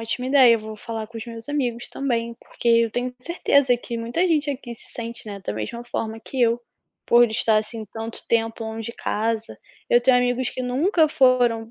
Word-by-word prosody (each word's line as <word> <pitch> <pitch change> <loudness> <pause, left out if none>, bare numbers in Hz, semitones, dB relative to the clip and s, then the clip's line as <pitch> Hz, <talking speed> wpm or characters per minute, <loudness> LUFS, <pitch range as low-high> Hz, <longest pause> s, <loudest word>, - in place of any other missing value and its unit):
ótima 230 +3 -3
ideia, 260 -4 +7
vou 215 0 -8
falar 220 0 -5
com 230 +1 -9
os 220 - -7
meus 230 +2 -8
amigos 245 -5 -2
também, 235 -4 -2
porque 240 - -11
eu 230 -1 +4
tenho 245 +2 -3
certeza 280 -5 +2
que 235 -1 -6
muita 240 +11 0
gente 305 -3 +2
aqui 250 -3 -6
se - - -11
sente, 235 -1 -6
né, 200 -1 -7
da - - -2
mesma 170 - -5
forma 225 -2 -4
que 265 - -5
eu, 235 +1 +3 0.5
por 240 0 +6
estar 220 0 +3
assim 220 +1 -5
tanto 225 0 -6
tempo 225 0 0
longe 220 0 -5
de - - -16
casa, 225 +1 -2 0.3
eu 240 - +6
tenho 250 +1 +4
amigos 245 0 0
que 255 - -5
nunca 310 +7 +2
foram, 245 -6 +3
235 Hz, 200 wpm, -23 LUFS, 225-255 Hz, 0.5 s, ideia